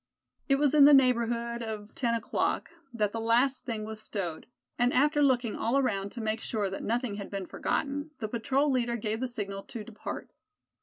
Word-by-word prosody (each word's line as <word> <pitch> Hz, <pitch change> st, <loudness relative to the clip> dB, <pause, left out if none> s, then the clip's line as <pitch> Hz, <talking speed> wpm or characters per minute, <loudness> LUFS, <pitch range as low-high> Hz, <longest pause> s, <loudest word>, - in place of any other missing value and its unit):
It 275 Hz, -, +6 dB
was 285 Hz, 0 st, +2 dB
in 295 Hz, -2 st, +8 dB
the 290 Hz, 0 st, +9 dB
neighborhood 235 Hz, -2 st, +2 dB
of 215 Hz, -2 st, -6 dB
ten 235 Hz, -3 st, 0 dB
o'clock 230 Hz, 0 st, -1 dB, 0.2 s
that 210 Hz, -4 st, 0 dB
the 225 Hz, -, -3 dB
last 245 Hz, +4 st, +2 dB
thing 220 Hz, -3 st, -3 dB
was 220 Hz, 0 st, -7 dB
stowed; 185 Hz, -7 st, -4 dB, 0.3 s
and 245 Hz, +1 st, +4 dB
after 295 Hz, +3 st, +3 dB
looking 245 Hz, -5 st, +2 dB
all 235 Hz, +4 st, +1 dB
around 200 Hz, -7 st, 0 dB
to 240 Hz, -, -5 dB
make 220 Hz, 0 st, -1 dB
sure 205 Hz, -4 st, -2 dB
that 195 Hz, -, -4 dB
nothing 235 Hz, -2 st, -1 dB
had 200 Hz, -, -6 dB
been 195 Hz, -2 st, -4 dB
forgotten, 285 Hz, -, -2 dB
the 220 Hz, -, -3 dB
patrol 265 Hz, +6 st, +1 dB
leader 240 Hz, -2 st, +1 dB
gave 220 Hz, -1 st, -2 dB
the 260 Hz, -, -1 dB
signal 200 Hz, -5 st, -4 dB
to 225 Hz, -, -7 dB
depart. 215 Hz, 0 st, -7 dB
235 Hz, 195 wpm, -29 LUFS, 215-260 Hz, 0.3 s, the